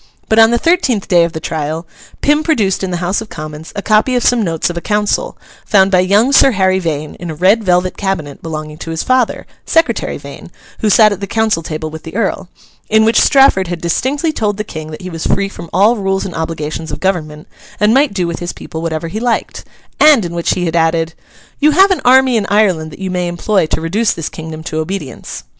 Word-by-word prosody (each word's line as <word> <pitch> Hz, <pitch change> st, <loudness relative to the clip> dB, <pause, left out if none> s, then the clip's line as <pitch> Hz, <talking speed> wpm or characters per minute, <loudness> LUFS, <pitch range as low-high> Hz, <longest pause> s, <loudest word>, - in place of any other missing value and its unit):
But 220 Hz, -, +4 dB
on 225 Hz, 0 st, +7 dB
the 235 Hz, -, +2 dB
thirteenth 265 Hz, -, +1 dB
day 175 Hz, -2 st, +4 dB
of 170 Hz, -, -5 dB
the 160 Hz, -, -4 dB
trial, 160 Hz, +1 st, -4 dB, 0.4 s
Pym 295 Hz, +1 st, +3 dB
produced 220 Hz, -, 0 dB
in 190 Hz, -, -2 dB
the 175 Hz, -, -2 dB
House 190 Hz, +5 st, 0 dB
of 220 Hz, -, -9 dB
Commons 155 Hz, +1 st, -8 dB
a 200 Hz, -, -4 dB
copy 215 Hz, +4 st, +2 dB
of 245 Hz, -, +1 dB
some 245 Hz, -1 st, +3 dB
notes 165 Hz, -5 st, -1 dB
of -, -, -9 dB
a 170 Hz, -, -4 dB
council, 210 Hz, -, -1 dB, 0.3 s
found 195 Hz, -2 st, +3 dB
by 185 Hz, -, +4 dB
young 205 Hz, +8 st, +3 dB
Sir 270 Hz, -2 st, +5 dB
Harry 190 Hz, -1 st, +2 dB
Vane 155 Hz, -4 st, -3 dB
in 175 Hz, -, -6 dB
a 160 Hz, -, -5 dB
red 195 Hz, +7 st, +3 dB
velvet 180 Hz, -1 st, +1 dB
cabinet 170 Hz, -8 st, -3 dB
belonging 155 Hz, -1 st, -6 dB
to -, -, -7 dB
his 160 Hz, 0 st, -3 dB
father 255 Hz, -2 st, 0 dB, 0.2 s
(Secretary 325 Hz, 0 st, 0 dB
Vane, -, -, -11 dB, 0.3 s
who 215 Hz, -, +1 dB
sat 215 Hz, +1 st, +6 dB
at 200 Hz, -, -3 dB
the 200 Hz, -, -4 dB
council 220 Hz, -4 st, 0 dB
table 155 Hz, -1 st, -5 dB
with 160 Hz, 0 st, -8 dB
the 160 Hz, -, -10 dB
Earl), 200 Hz, -4 st, -2 dB, 0.4 s
in 220 Hz, 0 st, +4 dB
which 225 Hz, -, +4 dB
Strafford 270 Hz, -10 st, +4 dB
had 175 Hz, 0 st, -4 dB
distinctly 275 Hz, -, -1 dB
told 210 Hz, -6 st, -1 dB
the 210 Hz, -, -2 dB
King 155 Hz, -6 st, -8 dB
that 155 Hz, +3 st, -9 dB
he 185 Hz, -, -6 dB
was 165 Hz, -1 st, -4 dB
free 200 Hz, 0 st, +1 dB
from 170 Hz, -4 st, -10 dB
all 210 Hz, +5 st, +4 dB
rules 195 Hz, -1 st, -1 dB
and 185 Hz, -, -6 dB
obligations 160 Hz, -1 st, -4 dB
of -, -, -5 dB
government, 155 Hz, -5 st, -2 dB, 0.3 s
and 210 Hz, +1 st, +3 dB
might 275 Hz, +2 st, +3 dB
do 185 Hz, -3 st, -1 dB
with 170 Hz, -1 st, -4 dB
his 175 Hz, 0 st, -5 dB
people 160 Hz, -, -8 dB
whatever 165 Hz, 0 st, -3 dB
he 205 Hz, +6 st, -5 dB
liked; 235 Hz, 0 st, -2 dB, 0.4 s
and 290 Hz, -9 st, +6 dB
in 170 Hz, -, -5 dB
which 170 Hz, -1 st, 0 dB
he 180 Hz, -, -2 dB
had 165 Hz, 0 st, -2 dB
added—'You 165 Hz, -, -1 dB
have 385 Hz, +4 st, +5 dB
an 375 Hz, -, 0 dB
army 255 Hz, -1 st, +5 dB
in 205 Hz, -3 st, -1 dB
Ireland 190 Hz, -7 st, +2 dB
that -, -, -11 dB
you 190 Hz, -1 st, -4 dB
may 180 Hz, -1 st, -1 dB
employ 175 Hz, +1 st, 0 dB
to -, -, -1 dB
reduce 200 Hz, +8 st, 0 dB
this 165 Hz, -2 st, -5 dB
kingdom 160 Hz, 0 st, -8 dB
to 160 Hz, -1 st, -4 dB
obedience. 155 Hz, -, -6 dB
190 Hz, 230 wpm, -15 LUFS, 165-220 Hz, 0.4 s, on